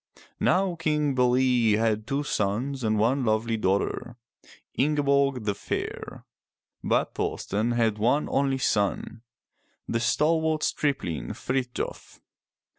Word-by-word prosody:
Now 185 0 +2
King 150 -3 0
Be'le 125 -3 +3
had 110 -1 0
two 140 +3 -1
sons 125 +3 -1
and 110 -1 +1
one 125 +6 +2
lovely 110 0 +1
daughter, 110 +4 -1 0.6
Ing' 150 +3 +1
e - - +3
borg 140 -3 +2
the 105 -1 0
Fair. - - -5 0.6
But - - +1
Thor'sten 110 +4 -1
had 115 -3 +1
one 125 +7 +2
only 135 -1 +1
son, 110 -1 -1 0.7
the 115 - 0
stalwart 155 +7 +1
stripling 85 - -1
Frith'jof. 130 -1 -4
125 Hz, 115 wpm, -26 LUFS, 110-140 Hz, 0.7 s, Be'le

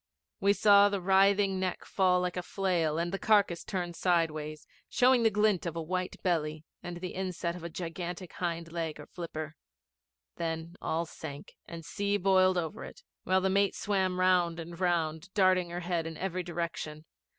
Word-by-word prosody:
We 200 +1 +4
saw 205 0 +6
the 200 -1 -1
writhing 195 +1 +3
neck 185 -1 -2
fall 180 -2 +2
like 180 -1 -2
a 180 - -1
flail, 175 -5 0
the 175 +4 -1
carcase 200 -6 +3
turn 175 -3 -3
sideways, 155 -4 0 0.2
showing 255 0 +4
the 225 - +5
glint 210 -4 +2
of 170 - -4
a 165 - -2
white 185 +2 -2
belly 155 -3 -1 0.2
and 175 0 -6
the 180 +1 -5
inset 180 -2 -3
of 180 - -9
a 170 - -4
gigantic 175 +1 -6
hind 170 -2 -3
leg 165 -3 -3
or 150 - -9
flipper. 155 -3 -6 0.8
Then 165 0 -4
all 165 +1 -1
sank, 145 -3 -9
and 165 -1 -8
sea 205 +2 -1
boiled 185 -1 +4
over 175 +4 -3
it, - - -11 0.2
while 185 0 +3
the 190 0 +1
mate 200 0 +2
swam 190 -3 0
round 180 -2 +3
and 170 +1 -8
round, 170 -1 0
darting 185 -3 +3
her 175 +1 -4
head 170 -2 -1
in 160 -1 -7
every 185 -1 -2
direction. 170 -3 -5
180 Hz, 175 wpm, -30 LUFS, 165-190 Hz, 0.8 s, saw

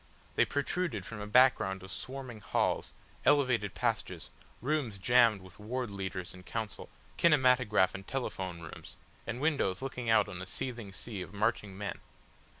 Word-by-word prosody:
They - - +5
protruded 170 +4 -1
from 105 -2 -6
a 105 - -5
background 105 -6 +4
of 95 - -9
swarming 130 +2 -6
halls, - - 0 0.3
elevated 125 -8 +3
passages, - - -2 0.3
rooms 130 -5 -1
jammed 115 -1 +4
with 95 - -15
ward 120 +2 -3
leaders 95 -2 -4
in 90 - -11
council, 105 +3 -5 0.3
kinematograph 125 - +4
and 95 0 -8
telephone 95 -10 -3
rooms, 80 - -9 0.3
and 120 +1 -3
windows 140 -10 +1
looking 125 -3 -3
out 110 - +5
on 90 -3 -6
a 90 - -6
seething 115 -1 -5
sea 100 0 -6
of 90 +3 -8
marching 105 -2 0
men. 100 0 -4
110 Hz, 150 wpm, -32 LUFS, 95-130 Hz, 0.3 s, They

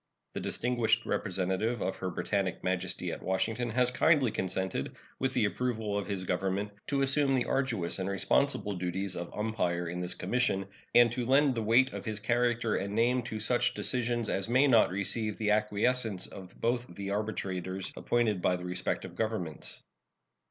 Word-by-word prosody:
The - - -3
distinguished 120 -2 +1
representative 95 +4 -1
of 95 - -2
Her 95 - -3
Britannic 95 +1 -2
Majesty 90 -1 -2
at - - -6
Washington 110 +5 -1
has 125 +2 +2
kindly 135 -2 +3
consented, 95 0 -2 0.2
with 130 0 0
the - - +3
approval 110 -1 -1
of 100 -3 -2
his 95 -2 0
Government, 95 +3 -1 0.2
to 140 -1 +1
assume 135 0 +3
the 125 - +1
arduous 115 -11 0
and 95 +1 -2
responsible 105 +2 +1
duties 90 +1 -2
of 85 0 -5
umpire 90 -6 -1
in 90 +2 -4
this 90 0 -2
commission, 125 -6 0 0.3
and 120 -1 +7
to 125 +1 -2
lend 135 +1 +4
the 115 - -2
weight 120 +5 +4
of - - -5
his 110 -2 -3
character 120 0 +1
and 100 +1 -3
name 120 +3 +3
to 110 -2 -5
such 120 +3 +1
decisions 120 -2 0
as 95 +3 -1
may 130 +4 +5
not 120 -6 +5
receive 100 +3 -1
the 105 -1 +1
acquiescence 105 0 +1
of 95 -2 -11
both 120 +1 0
the 100 +1 -4
arbitrators 95 -3 -3
appointed 110 -6 +1
by 90 - +2
the 90 0 -6
respective 90 0 -3
Governments. 105 -7 -3
110 Hz, 170 wpm, -30 LUFS, 95-120 Hz, 0.3 s, and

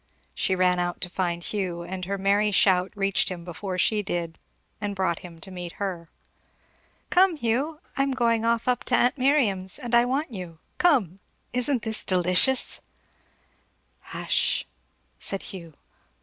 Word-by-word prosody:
She 190 - 0
ran 180 -1 +3
out 175 0 -2
to 180 - -3
find 175 -2 -2
Hugh, 180 -4 -3
and 185 +1 -5
her 200 +2 -2
merry 200 +2 +2
shout 190 -2 +3
reached 195 -1 +2
him 180 -2 -6
before 185 +2 -5
she 210 +3 +2
did, 170 -4 -4 0.4
and 205 -1 -3
brought 185 -3 0
him 170 -2 -11
to 190 - -9
meet 175 -2 -7
her. 180 -5 -5 1.0
"Come, 365 -1 +5
Hugh! 280 +6 -1
I'm 275 0 +1
going 230 -3 +1
off 230 +1 +1
up 250 -1 +1
to - - +2
aunt 250 +3 +2
Miriam's, 230 -9 +2
and 245 -4 -6
I 235 0 +6
want 275 +4 -1
you. 180 -6 -7 0.2
Come! 235 - +3 0.3
Isn't 250 0 +1
this 220 -1 -1
delicious?" 185 +8 +3 1.2
"Hush! - - 0 0.2
" - - -43
said 195 - -4
Hugh. 170 -5 -8
195 Hz, 155 wpm, -25 LUFS, 180-240 Hz, 1.2 s, I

